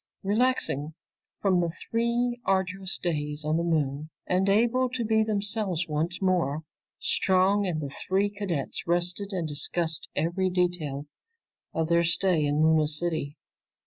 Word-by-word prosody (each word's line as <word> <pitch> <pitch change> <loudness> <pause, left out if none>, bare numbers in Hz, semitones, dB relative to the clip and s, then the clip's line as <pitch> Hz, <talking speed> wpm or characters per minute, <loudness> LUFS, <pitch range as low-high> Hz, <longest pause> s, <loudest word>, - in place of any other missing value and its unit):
Relaxing 200 - 0 0.5
from 185 -3 +3
the 170 - 0
three 235 +6 -1
arduous 190 -1 0
days 150 -3 -2
on 155 +1 +1
the 170 - +1
Moon 155 -3 -1 0.2
and 185 +2 +1
able 240 +5 +3
to 245 -2 -3
be 220 0 +3
themselves 205 -4 0
once 160 +3 -2
more, 170 -6 0 0.4
Strong 190 +2 +2
and 165 -4 -1
the 140 -1 -5
three 195 +2 +2
cadets 190 -10 -3
rested 175 +4 0
and 175 -4 -2
discussed 160 +2 0
every 175 +5 0
detail 175 -6 -1 0.7
of 160 -1 0
their 170 +1 +3
stay 170 -1 +2
in 145 +1 +2
Luna 160 -1 +4
City. 155 -1 -2
175 Hz, 140 wpm, -27 LUFS, 155-200 Hz, 0.7 s, Luna